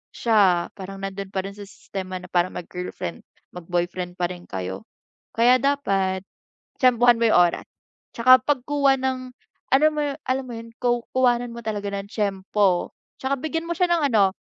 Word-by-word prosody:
siya 195 -7 +3
parang 195 +1 -7
nandun 195 0 -4
pa 190 - -2
rin 195 - -6
sa 205 - -9
sistema 190 -2 -7
na 180 - -11
parang 175 0 +1
mag-girlfriend/mag-boyfriend 175 - -5
pa 175 - +1
rin 180 -1 -9
kayo. 95 0 -5 0.5
Kaya 240 +2 +5
dapat 195 -9 0 0.6
tiyempuhan 245 -1 +5
mo 230 - +3
yung - - +6
oras, - - -8 0.5
tsaka 255 +2 +7
pagkuha 280 0 +2
ng 260 0 -1 0.5
alam 305 +4 +5
mo 300 - 0
yu 290 -1 -1
alam 260 +1 0
mo 245 - -7
yun 230 0 -8
ku 240 -1 +1
kuhanan 245 -2 +2
mo 235 - -6
talaga 210 -2 -3
ng 200 0 -5
tiyempo. 195 -2 0 0.3
Tsaka 270 +1 +1
bigyan 325 +3 -2
mo - - -3
siya 360 - +2
ng 340 - +3
ano 200 -3 +4
210 Hz, 165 wpm, -23 LUFS, 185-255 Hz, 0.6 s, tsaka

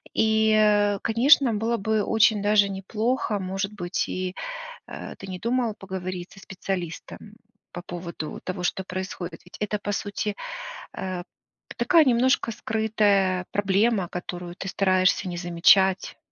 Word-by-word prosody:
И, 220 0 +3
э, 210 -1 +4
конечно, 245 +2 +5
было 225 +3 0
бы 220 +1 0
очень 220 -1 +3
даже 205 -1 +4
неплохо, 215 +4 -1
может 195 +1 -3
быть, 175 -3 -2
и, 185 0 -3 0.6
э, - - -7
ты 195 - -9
не 185 -1 -6
подумала 235 +1 0
поговорить 185 -2 -6
со 195 - -14
специалистом 190 +1 -6 0.4
по 175 - -6
поводу 170 -3 -6
того, 185 -1 -4
что 190 +1 -1
происходит? 185 -2 -5
Ведь 180 - -12
это, 210 0 -1
по 205 0 -3
сути, 205 +1 -3 0.6
э, 185 -2 -4 0.5
такая, 335 -3 +5
немножко 255 -2 +2
скрытая 205 -4 +1
проблема, 200 -1 +2
которую 175 0 -6
ты 190 - -6
стараешься 185 0 +2
не 175 - -5
замечать. 180 +2 +3
195 Hz, 135 wpm, -25 LUFS, 185-220 Hz, 0.6 s, конечно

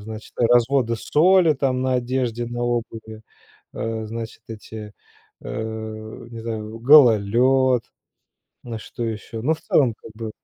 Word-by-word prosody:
значит, 110 +1 -9
разводы 120 0 +3
соли 170 +4 +4
там 130 -2 0
на 130 0 +1
одежде, 120 -1 -1
на 120 0 -4
обуви, 115 -2 -4 0.5
э, 115 0 -3
значит, 115 0 -7
эти, 110 -1 -9 0.5
э, 110 0 -6
не 115 - -8
знаю, 110 -1 -5
гололёд, 125 -1 +5 0.8
ну, 115 -2 -5
что 120 - -7
ещё. 110 0 -5
Ну, 155 +5 +2
в 160 - -13
целом, 125 -6 +2
как - - -12
бы 110 0 -6
115 Hz, 130 wpm, -22 LUFS, 110-130 Hz, 0.8 s, гололёд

